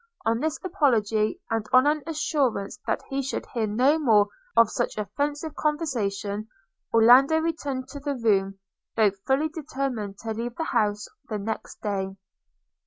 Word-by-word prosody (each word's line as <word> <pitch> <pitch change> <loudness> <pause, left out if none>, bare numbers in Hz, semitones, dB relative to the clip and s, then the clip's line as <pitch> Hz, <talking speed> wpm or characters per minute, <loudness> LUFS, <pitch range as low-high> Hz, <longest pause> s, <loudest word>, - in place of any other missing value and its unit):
On 225 +1 +2
this 315 +3 -1
apology, 225 - +1
and 225 -1 -1
on 255 +1 +6
an 300 +1 +2
assurance 270 -9 -1
that - - -1
he 275 0 0
should 270 +1 -3
hear 225 -3 0
no 255 +9 +3
more 215 -8 +4 0.3
of 230 -2 +6
such - - -2
offensive 290 - -2
conversation, 220 -9 -2 0.4
Orlando 250 +7 +6
returned 290 -5 -2
to 285 - -7
the 285 0 -3
room, 195 -5 +1 0.4
though 215 -3 +4 0.2
fully 280 +4 +2
determined 265 -10 -4
to 225 -1 -2
leave 235 +2 -4
the 325 - -2
house 210 -8 0 0.2
the 215 - -2
next 220 +2 -5
day. 195 -2 -2
240 Hz, 150 wpm, -26 LUFS, 210-290 Hz, 0.4 s, on